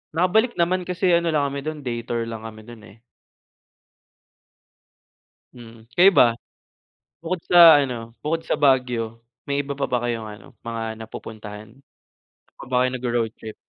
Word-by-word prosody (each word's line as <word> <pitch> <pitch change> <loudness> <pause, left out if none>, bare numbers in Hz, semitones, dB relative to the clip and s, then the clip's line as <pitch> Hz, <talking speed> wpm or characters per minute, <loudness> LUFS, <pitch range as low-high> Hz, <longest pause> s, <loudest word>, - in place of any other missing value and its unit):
Nakabalik 220 +8 +2
naman, 180 +1 0
kasi 180 0 0
ano 170 0 +2
lang 140 -2 +1
kami 140 - -4
do'n 155 -1 -5
day 120 -2 -3
tour 115 -1 -1
lang 115 -1 -7
kami 110 -1 -12
do'n, 120 0 -12 0.2
eh. - - -25 2.6
Mm, 115 -1 -14
kayo 185 +3 +7
ba? 175 - +6 1.0
Bukod 175 +2 -2
sa 170 -4 +8
ano 120 -4 -4
bukod 165 +2 -2
sa 155 - -2
Baguio, 125 -5 +1 0.2
may 140 0 -1
iba 140 - -6
pa 140 - 0
ba 125 -1 -1
kayong 115 -2 -3
ano, 105 0 -11
mga 115 -1 -5
napupuntahan? 110 -1 -9
Saan 135 - -34 0.6
pa - - -10
ba 125 - +2
kayo 130 0 +2
nagro-road 120 -3 -1
trip? 110 -1 -9
125 Hz, 160 wpm, -23 LUFS, 115-160 Hz, 2.6 s, sa